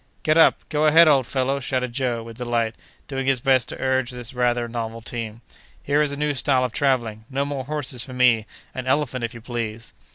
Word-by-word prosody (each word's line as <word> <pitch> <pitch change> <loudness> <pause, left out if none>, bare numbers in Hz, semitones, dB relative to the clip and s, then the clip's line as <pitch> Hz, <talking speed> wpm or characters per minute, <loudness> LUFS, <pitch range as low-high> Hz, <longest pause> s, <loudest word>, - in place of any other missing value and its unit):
"Get 155 - +3
up—go 155 -2 +3
ahead, 165 +2 +7
old 135 -5 +4
fellow!" 135 +1 0
shouted 125 -2 -2
Joe, 120 -3 -1
with 115 +1 -11
delight, 120 -2 0 0.3
doing 135 -1 -3
his 135 -2 +3
best 130 -1 +2
to - - -7
urge 130 -2 +1
this 125 0 -6
rather 120 -1 +1
novel 115 -1 -4
team. 115 -1 -6 0.4
"Here 145 +1 +2
is 150 -1 +1
a 140 - -4
new 150 0 0
style 130 -1 +2
of 125 -2 -2
travelling!—no 130 0 -1
more 140 -2 -4
horses 135 -4 -2
for 130 - -9
me. 125 -4 +3 0.3
An 130 -1 -5
elephant, 130 -2 0
if 115 0 -3
you 115 - -9
please!" 115 -1 -5
125 Hz, 200 wpm, -23 LUFS, 120-140 Hz, 0.4 s, ahead